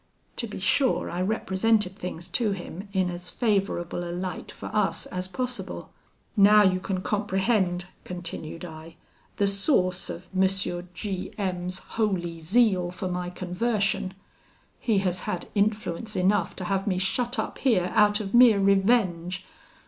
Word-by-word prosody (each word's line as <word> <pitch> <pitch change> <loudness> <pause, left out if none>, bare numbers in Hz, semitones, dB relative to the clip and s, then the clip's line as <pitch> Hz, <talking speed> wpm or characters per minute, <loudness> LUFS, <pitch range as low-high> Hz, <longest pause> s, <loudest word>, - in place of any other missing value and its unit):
To - - -2
be - - -7
sure, 270 -2 +2
I 175 - -2
represented 205 0 +1
things 180 -4 -6
to 220 -5 +1
him 190 +1 -7
in 185 -2 +1
as 175 +1 -6
favourable 195 -6 0
a 175 - -5
light 180 +1 -4
for - - -10
us 210 -2 +1
as 185 0 -4
possible. 245 -1 -4 0.4
'Now 210 0 +7
you 185 -2 +3
can 185 0 -3
comprehend,' 190 -3 +1 0.2
continued 170 -2 -6
I, 160 0 -10 0.4
'the 200 - +3
source 195 - +1
of 175 - -7
M. 190 0 +5 0.5
G 190 0 -4
M 180 -3 -2
's 185 - -3
holy 185 -7 -2
zeal 185 0 +3
for 180 +1 -4
my 180 0 -2
conversion. 190 +1 -1 0.6
He 220 -4 +1
has 180 0 +1
had 175 - -3
influence 210 0 -1
enough 185 -1 +2
to 185 - -5
have 195 +2 -1
me 185 -3 +1
shut 240 +7 0
up 220 - -3
here, 185 -9 +2
out 210 -1 +4
of 200 -2 -5
mere 240 -4 +7
revenge. 190 -3 +2
190 Hz, 150 wpm, -26 LUFS, 180-210 Hz, 0.6 s, Now